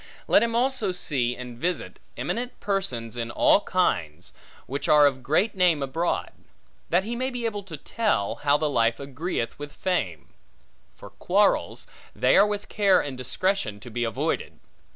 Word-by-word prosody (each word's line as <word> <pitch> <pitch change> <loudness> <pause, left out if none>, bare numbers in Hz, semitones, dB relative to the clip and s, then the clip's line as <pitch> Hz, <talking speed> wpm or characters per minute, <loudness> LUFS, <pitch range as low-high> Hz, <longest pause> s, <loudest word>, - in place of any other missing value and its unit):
Let - - +5
him 230 0 0
also 245 -5 +1
see, 130 -9 0
and 125 -2 -8
visit, 180 +5 -2 0.2
eminent 245 +1 -3
persons 130 - -2
in 115 -1 -3
all 120 - +4
kinds, 85 - -1 0.3
which 140 +2 -4
are 150 -1 +7
of 135 -2 +1
great 160 - +1
name 175 -6 +3
abroad; 165 +6 -1 0.6
that 175 +3 +3
he 230 +4 -4
may 255 +2 -1
be 245 -2 -4
able 210 -3 -2
to 180 -6 -9
tell, 205 - -1
how 145 0 +3
the 155 - 0
life 115 -4 +1
agreeth 140 -3 -4
with 145 0 -7
the - - -25
fame. 135 - -2 0.7
For - - -12
quarrels, - - +1 0.3
they 125 - +3
are 200 +2 +6
with 205 0 -4
care 200 -3 +3
and 140 -3 -4
discretion 130 - -1
to 120 +1 -10
be 120 +2 -2
avoided. 130 +8 -2
150 Hz, 170 wpm, -25 LUFS, 125-200 Hz, 0.7 s, are